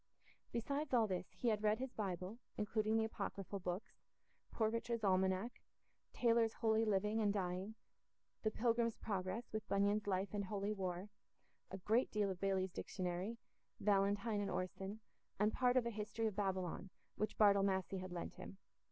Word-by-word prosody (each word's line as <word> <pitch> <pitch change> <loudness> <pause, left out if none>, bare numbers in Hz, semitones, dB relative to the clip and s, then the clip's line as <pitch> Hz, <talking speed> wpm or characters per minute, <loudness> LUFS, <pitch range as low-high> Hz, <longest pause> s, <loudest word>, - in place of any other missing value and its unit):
Besides 280 +4 -1
all 230 -2 +5
this, 185 -3 -2
he 240 - -1
had 210 -2 +1
read 215 0 +3
his 260 +1 -4
Bible, 190 +1 -3 0.2
including 215 +1 +1
the 225 - +3
apocryphal 200 -2 -3
books; 180 +3 -4 0.5
Poor 220 - +2
Richard's 230 0 -1
Almanac, 190 +3 +2 0.5
Taylor's 230 -2 +3
Holy 220 -1 +2
Living 210 +1 +2
and 205 -2 +3
Dying, 190 +1 -2 0.7
The 215 - +2
Pilgrim's 230 +1 +1
Progress, 195 +3 -3
with 215 -1 -3
Bunyan's 200 +1 +2
Life 195 +1 0
and 205 -1 -1
Holy 200 +1 -1
War, 185 0 -3 0.6
a 190 - -5
great 220 +6 +2
deal 205 -2 +1
of 180 - -7
Bailey's 190 -1 +1
Dictionary, 185 +5 -3 0.4
Valentine 205 +1 +2
and 200 - -1
Orson, 190 +3 -3 0.4
and 210 +2 +3
part 250 0 +3
of 250 - +3
a 235 - 0
History 215 +1 -2
of 215 -3 0
Babylon, 190 -2 -1 0.3
which 215 0 -2
Bartle 200 -2 +6
Massey 190 -1 +1
had 185 0 -6
lent 175 -1 -4
him. 195 - -9
205 Hz, 160 wpm, -39 LUFS, 190-220 Hz, 0.7 s, Bartle